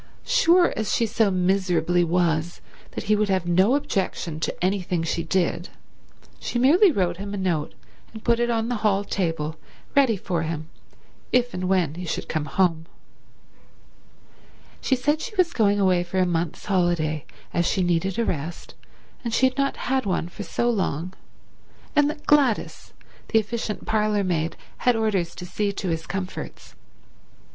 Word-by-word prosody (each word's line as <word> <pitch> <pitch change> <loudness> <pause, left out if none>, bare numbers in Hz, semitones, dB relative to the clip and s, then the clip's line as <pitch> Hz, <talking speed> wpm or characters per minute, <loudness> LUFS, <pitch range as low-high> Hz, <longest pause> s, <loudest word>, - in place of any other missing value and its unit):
Sure 350 +1 +4
as 220 - -1
she 230 - +2
so 220 -1 +2
miserably 180 -2 +2
was 170 -1 0 0.3
that - - -4
he 210 - +3
would 210 -1 +1
have 190 -2 +1
no 185 +8 +4
objection 185 - -2
to 165 - -2
anything 180 -3 0
she 165 +1 -1
did, 175 +1 -1 0.7
she - - -3
merely 330 - +6
wrote 180 - 0
him 200 +1 -5
a - - -4
note 175 -6 -1 0.4
and 220 -1 -10
put 235 -1 +2
it 240 0 +1
on 225 -1 0
the 245 -1 -1
hall 205 -2 +1
table 165 -6 -2 0.4
ready 265 -7 +4
for 180 -2 -2
him 160 -1 -4 0.6
if 245 -1 +2
and 185 0 -2
when 180 -6 +2
he 175 +3 -7
should 170 - -3
come 155 -2 -2
home. 165 -1 +1 1.9
She 265 - +2
said 295 +5 0
she 430 - -6
was 360 -3 +2
going 205 -3 +3 0.3
for 185 +2 -4
a 185 - +4
month's 170 -2 -2
holiday 175 -6 +1 0.3
as 170 0 +1
she 190 - +1
needed 175 +2 0
a 235 - +1
rest 165 -1 -4 0.5
and 235 - -2
she 255 - +3
had 260 0 +1
not 275 0 +1
had 260 -4 -1
one 175 -2 -1
for 190 - -9
so 235 +3 -1
long, 185 -6 -1 0.8
and 295 0 +4
that 300 0 -7
Gladys, 275 -7 +2 0.3
the 225 - +2
efficient 220 0 -2
parlourmaid, 200 -7 0 0.2
had 245 -2 +2
orders 200 -6 0
to 180 - -7
see 205 +3 -1
to 195 -2 -3
his 165 0 -3
comforts. 190 -1 -6
190 Hz, 165 wpm, -24 LUFS, 170-225 Hz, 1.9 s, merely